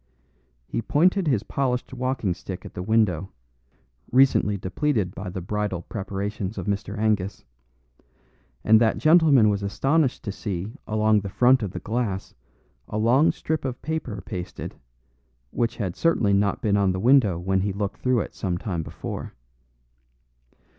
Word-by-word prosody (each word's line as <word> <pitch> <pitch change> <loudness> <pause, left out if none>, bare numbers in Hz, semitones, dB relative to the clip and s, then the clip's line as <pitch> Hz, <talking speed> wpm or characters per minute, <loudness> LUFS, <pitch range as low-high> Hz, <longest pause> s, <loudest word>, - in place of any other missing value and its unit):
He 115 - -3
pointed 180 - +2
his 120 -8 +2
polished 125 -1 -2
walking 125 -6 -1
stick 90 +1 -8
at - - -9
the 90 - -5
window, 95 -4 +1 0.8
recently 125 -5 +4
depleted 100 - -1
by 95 -1 -6
the 95 0 -5
bridal 105 -2 -2
preparations 100 0 -4
of 95 - -4
Mr. 100 0 -3
Angus; 105 -3 -1 1.2
and 110 +1 +6
that 110 -1 +3
gentleman 155 -8 +5
was 100 -1 +1
astonished 135 +8 +1
to 100 - -3
see 100 +1 -5
along 110 0 +3
the 100 - -5
front 125 +5 +4
of 105 - -2
the - - -6
glass 110 -4 -3 0.5
a 105 - -4
long 120 +8 +4
strip 160 0 -3
of 130 -3 -4
paper 140 -11 -4
pasted, 90 -1 -6 0.8
which 120 -1 -1
had 95 -6 -3
certainly 120 -12 +2
not 100 0 +1
been 105 -2 +2
on 100 -2 +2
the 95 - -3
window 115 -5 +4
when 95 +2 0
he 100 +1 -1
looked 100 +1 -4
through 125 -3 +2
it - - -6
some 90 -3 -2
time 90 -3 -3
before. 75 - -7
105 Hz, 155 wpm, -24 LUFS, 95-125 Hz, 1.2 s, and